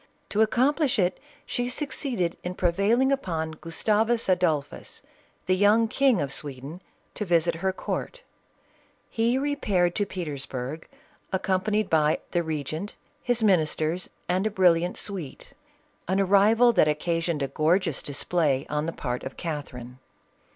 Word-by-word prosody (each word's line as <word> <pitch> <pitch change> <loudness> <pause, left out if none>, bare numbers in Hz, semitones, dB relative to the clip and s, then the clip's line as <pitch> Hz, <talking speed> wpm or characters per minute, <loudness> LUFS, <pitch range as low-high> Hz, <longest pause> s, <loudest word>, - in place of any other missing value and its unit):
To 210 - +1
accomplish 260 +6 +2
it, 180 -3 +1 0.3
she 245 0 -2
succeeded 250 - -2
in 180 +1 -4
prevail 200 +7 +2
ing 265 +1 +3
upon 165 -12 -1
Gustavus 215 +8 0
Adolphus, 175 -6 -1 0.4
the 185 - +2
young 210 +4 +4
King 260 -3 +3
of 140 -1 -2
Sweden, 145 +4 -5 0.3
to - - -3
visit 170 -3 +2
her 190 0 +1
court - - -5 0.9
He 235 +2 +1
repaired 210 -11 +1
to 205 +1 -1
Peters 150 -8 -5
burg, 135 +5 -5 0.4
accompanied 195 +2 0
by 155 -1 +3
the 175 - +1
regent, 160 +4 -4 0.3
his 245 -2 +1
ministers, 165 -3 +1 0.2
and 185 +4 +1
a - - 0
brilliant 180 -3 +2
suite; 185 -9 -6 0.5
an 190 +2 +1
arrival 210 +5 +5
that 180 - +4
occasioned 165 0 -1
a - - 0
gorgeous 165 +2 +1
display 145 -1 0
on 150 +1 -1
the 165 - -3
part 125 -2 -4
of 135 - -7
Catherine. 130 -6 -6
180 Hz, 135 wpm, -26 LUFS, 155-215 Hz, 0.9 s, arrival